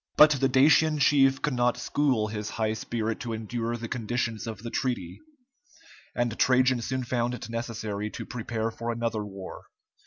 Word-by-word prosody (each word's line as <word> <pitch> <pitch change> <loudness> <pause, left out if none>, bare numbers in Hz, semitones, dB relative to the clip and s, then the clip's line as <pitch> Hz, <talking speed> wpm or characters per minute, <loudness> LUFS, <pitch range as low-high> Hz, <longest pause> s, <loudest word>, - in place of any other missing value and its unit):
But 150 0 +9
the 135 -2 +2
Dacian 150 +4 +5
chief 135 -1 +4
could 150 - +1
not 120 -1 +2
school 130 -7 +1
his 105 0 -4
high 110 -1 -1
spirit 110 0 -3
to 115 -2 -4
endure 115 +2 -3
the 115 0 -6
conditions 115 -1 -2
of 110 -1 -6
the 115 - -5
treaty, 120 -10 -2 1.0
and 120 -2 -1
Trajan 130 -1 +4
soon 130 +2 -2
found 120 0 -1
it 115 - -8
necessary 110 -3 -4
to - - -7
prepare 115 -1 -3
for 115 +1 -4
another 115 -2 -2
war. 95 -2 -8
120 Hz, 165 wpm, -27 LUFS, 110-130 Hz, 1.0 s, But